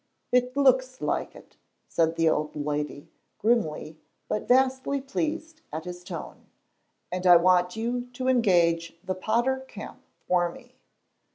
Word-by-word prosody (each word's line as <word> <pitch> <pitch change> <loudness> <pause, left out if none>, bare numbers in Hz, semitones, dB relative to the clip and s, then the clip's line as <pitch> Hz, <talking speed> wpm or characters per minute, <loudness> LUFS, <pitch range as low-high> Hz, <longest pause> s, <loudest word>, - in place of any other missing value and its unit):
"It 250 +1 +2
looks 260 -2 +3
like - - -2
it," - - -16 0.3
said 165 0 +1
the 165 0 +2
old 150 -1 0
lady, 150 -1 -3 0.3
grimly, 160 -9 0 0.3
but 210 - -2
vastly 260 +2 +2
pleased 315 +3 -3
at 155 +1 -5
his 180 0 -7
tone, 180 -3 -8 0.6
"and 180 0 -1
I 175 - +9
want 180 +1 +4
you 240 +2 -2
to 255 +1 -3
engage 175 -9 +2
the 185 - -2
Potter 235 +7 0
Camp - - -9 0.3
for 175 -1 +2
me." 250 +7 -16
210 Hz, 135 wpm, -27 LUFS, 170-255 Hz, 0.6 s, I